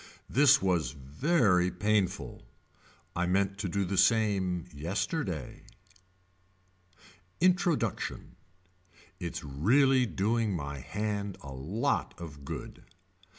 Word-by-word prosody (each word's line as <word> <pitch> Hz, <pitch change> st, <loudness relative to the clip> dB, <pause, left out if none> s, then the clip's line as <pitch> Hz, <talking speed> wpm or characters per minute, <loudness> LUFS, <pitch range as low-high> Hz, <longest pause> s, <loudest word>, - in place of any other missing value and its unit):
This 140 Hz, -6 st, +5 dB
was 85 Hz, -8 st, +1 dB
very 90 Hz, -, +2 dB
painful. 100 Hz, -, -1 dB, 0.7 s
I 90 Hz, +1 st, 0 dB
meant 100 Hz, +2 st, +1 dB
to 100 Hz, -3 st, -2 dB
do 100 Hz, +2 st, 0 dB
the 95 Hz, +1 st, 0 dB
same 100 Hz, -5 st, +2 dB
yesterday. 85 Hz, -, -3 dB, 1.8 s
Introduction. 175 Hz, -, 0 dB, 0.8 s
Its 85 Hz, 0 st, -5 dB
really 125 Hz, -, +3 dB
doing 110 Hz, 0 st, 0 dB
my 70 Hz, -3 st, -4 dB
hand 105 Hz, -, -3 dB
a 70 Hz, -1 st, -8 dB
lot 80 Hz, -, -1 dB
of 75 Hz, -4 st, -9 dB
good. -, -, -7 dB
95 Hz, 95 wpm, -30 LUFS, 80-110 Hz, 1.8 s, This